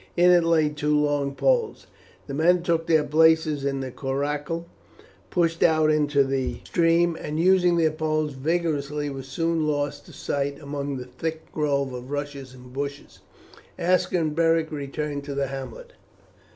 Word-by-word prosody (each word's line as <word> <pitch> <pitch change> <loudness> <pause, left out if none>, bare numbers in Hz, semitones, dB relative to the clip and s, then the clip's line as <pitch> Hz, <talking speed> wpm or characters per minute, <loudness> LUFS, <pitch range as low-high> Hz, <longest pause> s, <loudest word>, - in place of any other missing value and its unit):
In 175 +1 +6
it 175 -1 +5
lay 165 -2 +3
two 150 0 0
long 145 -2 0
poles. 485 -3 +1 0.4
The 140 - -7
men 170 +4 +3
took 165 -1 0
their 160 -2 +4
places 155 -1 +3
in 135 -1 -1
the 130 -1 -5
coracle, 145 +5 -3 0.6
pushed 165 -2 0
out 155 -2 +4
into 150 -2 +3
the 135 -1 -2
stream, 170 0 +2
and 150 +1 -3
using 180 0 +4
their 160 -2 +3
poles 155 -1 -1
vigorously 150 -1 -1
were 135 -1 -6
soon 160 +4 -1
lost 145 -1 -2
to - - -12
sight 140 0 -3
among 140 -1 -4
the 125 - -6
thick 160 +6 -6
grove 140 -3 0
of 125 +1 -7
rush 145 0 -3
and 130 -2 -12
bushes. 140 +1 -6 0.6
Aska 180 +1 +1
and 155 -2 -1
Beric 165 -1 +2
returned 145 0 -4
to 140 -1 -5
the 140 0 0
hamlet. 135 - -8
150 Hz, 160 wpm, -25 LUFS, 140-165 Hz, 0.6 s, In